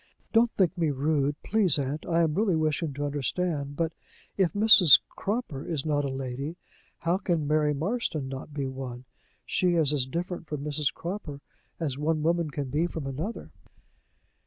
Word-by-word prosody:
"Don't 235 +1 +5
think 185 -2 +2
me 165 -4 +1
rude, 145 0 +1
please, 195 -8 +3
aunt: 140 +2 -3
I 170 0 +2
am 160 -2 +1
really 195 0 +2
wishing 155 0 0
to 145 +1 -2
understand 145 +1 -2
but, 165 0 -1 0.4
if 190 -4 +2
Mrs. 205 -7 +8
Cropper 200 - -3
is 155 -4 -3
not 145 -2 +1
a - - -1
lady, 135 +4 -4 0.5
how 170 +3 +1
can 170 -6 0
Mary 150 -1 +2
Marston 160 - -2
not 135 +2 -7
be 140 -2 -3
one? 130 -2 -6 0.4
She 180 -1 +1
is 155 -3 +3
as 135 -3 +1
different 175 +3 -4
from 150 -2 -4
Mrs. 150 -1 0
Croppor 170 -5 -6 0.4
as 145 -5 -2
one 155 0 0
woman 170 0 +1
can 140 -3 -4
be 155 +5 +1
from 160 -4 -6
another." 155 - -5
155 Hz, 170 wpm, -27 LUFS, 140-175 Hz, 0.5 s, Mrs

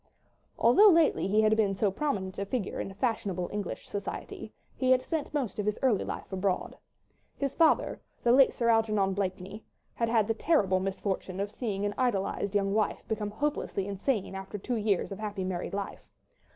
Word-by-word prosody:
Although 395 - +7
lately 330 - +4
he 210 +2 +3
had 215 0 +4
been 205 -3 +2
so 200 0 +1
prominent 195 -6 -2
a 200 - -1
figure 210 -2 -3
in - - -4
fashionable 200 -5 -1
English 205 -3 -4
society, 205 0 -6 0.2
he 255 - 0
had 255 0 +5
spent 320 -4 -3
most 270 -8 -2
of 210 - -1
his 210 - 0
early 235 -7 +3
life - - -6
abroad. 190 0 -1 0.6
His 275 -1 -2
father, 325 -2 +2 0.2
the 235 - +4
late 265 +1 +6
Sir 235 - -1
Algernon 215 -4 +2
Blakeney, 195 +2 -4 0.3
had 230 -1 -1
had 225 -3 +3
the 225 - +1
terrible 210 - +2
misfortune 190 0 -3
of 200 +1 -2
seeing 205 -4 -3
an 205 - -1
idolized 205 -4 0
young 195 -1 +2
wife 215 -1 0
become 215 -1 -2
hopelessly 220 -4 -2
insane 200 +1 -1
after 195 +2 -6
two 240 +4 -3
years 205 -2 0
of 195 - -6
happy 205 -3 -3
married 185 0 -3
life. 200 0 -6
205 Hz, 180 wpm, -29 LUFS, 195-235 Hz, 0.6 s, Although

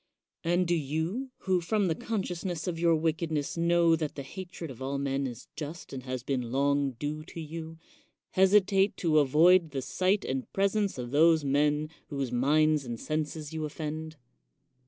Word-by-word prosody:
And 175 +2 +2
do 175 - +1
you, 165 - -2
who, 185 -2 +1
from 205 +4 +1
the 165 - +2
consciousness 180 -4 -3
of 170 -2 -3
your 170 -1 +4
wickedness, 160 -2 -1
know 170 0 +4
that 155 -2 -3
the 140 - -5
hatred 175 0 -7
of 130 0 -12
all 135 +1 -2
men 140 0 -1
is 120 -1 -9
just 155 +2 -7
and 130 - -5
has 130 -1 -5
been 125 -3 -2
long 140 0 +1
due 145 +6 -4
to 165 - -9
you, 160 +1 -7 0.5
hesitate 195 +1 +4
to 155 -3 +3
avoid 160 +5 +5
the 135 -2 -3
sight 190 +7 +1
and 130 0 -3
presence 200 -1 +1
of 125 -1 -5
those 160 +2 +5
men 150 +2 +2 0.2
whose 140 -3 -3
minds 150 +4 +3
and 120 -3 -5
senses 155 0 -3
you 160 - -3
oifend? 155 +1 -5
155 Hz, 170 wpm, -29 LUFS, 140-175 Hz, 0.5 s, avoid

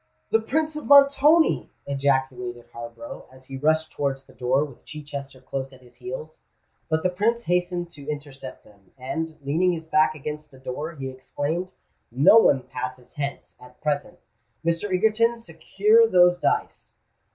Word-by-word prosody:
"The 225 - +4
Prince 305 +7 -1
of 305 - -6
Montoni!" 285 +3 +5 0.2
ejaculated 130 -3 -1
Harborough, 115 0 -9
as 130 0 -16
he 135 - -8
rushed 155 +3 +1
towards 135 -1 -2
the - - -19
door, 130 +3 +1
with 140 -5 -14
Chichester 140 -3 -8
close 135 +1 -5
at 130 -1 -17
his 120 - -20
heels. 480 +5 -8 0.5
But 160 0 0
the 185 - +2
Prince 230 +6 0
hastened 175 -1 -1
to 145 -4 -10
intercept 140 -3 -7
them; 100 -3 -23
and, 160 +5 -4
leaning 170 +6 +2
his 160 -1 -6
back 155 0 +3
against 150 +1 -6
the 135 - -17
door, 145 +5 -5
he 135 -2 -5
exclaimed, 145 +7 -4 0.4
"No 140 - +6
one 135 - +4
passes 125 0 -7
hence, 140 -2 -5
at 125 0 -16
present. 145 -2 -2 0.5
Mr. 170 +4 0
Egerton, 220 +5 +2
secure 430 - +3
those 180 - +5
dice." 430 - -2
150 Hz, 155 wpm, -24 LUFS, 130-185 Hz, 0.5 s, No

